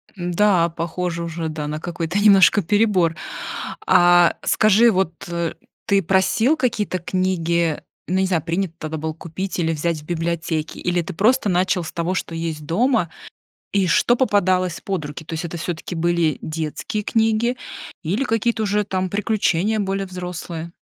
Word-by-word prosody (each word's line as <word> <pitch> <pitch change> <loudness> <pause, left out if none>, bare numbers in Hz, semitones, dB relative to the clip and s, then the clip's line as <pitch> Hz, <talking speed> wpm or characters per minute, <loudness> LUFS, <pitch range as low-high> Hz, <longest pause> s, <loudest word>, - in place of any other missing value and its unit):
Да, 175 0 +2
похоже 170 +1 -3
уже, 165 -1 -4
да, 155 -1 -4
на 150 +1 -3
какой-то 170 +2 -3
немножко 205 0 +6
перебор. 185 -3 +2 0.7
А 175 -1 +6
скажи, 215 +2 +4
вот 185 -4 0 0.7
ты 200 -2 +3
просил 205 - +2
какие-то 215 -8 -1
книги, 170 -3 0 0.3
ну, 180 - -1
не 190 - +2
знаю, 180 -4 +1
принято 170 +2 -2
тогда 155 0 -5
было 160 +1 -3
купить 175 +3 -5
или 165 -1 +1
взять 160 0 -2
в - - -17
библиотеке, 165 -1 -2
или 175 0 0
ты 185 - -6
просто 215 +4 +2
начал 180 0 +1
с - - -6
того, 170 +2 -1
что 170 -2 -3
есть 160 -2 -4
дома, 215 - +1 0.6
и 195 -2 +2
что 210 +8 +3
попадалось 185 -8 +1
под 185 -6 -3
руки? 150 +2 -8
То 165 - -7
есть 165 +2 -3
это 170 +1 -5
всё-таки 170 +1 -5
были 170 -1 +1
детские 160 +6 -4
книги 225 +3 +1 0.5
или 195 - 0
какие-то 225 -1 0
уже 210 0 +1
там 185 -2 -2
приключения 210 0 +1
более 195 -1 -1
взрослые? 180 -2 -6
180 Hz, 155 wpm, -21 LUFS, 165-200 Hz, 0.7 s, немножко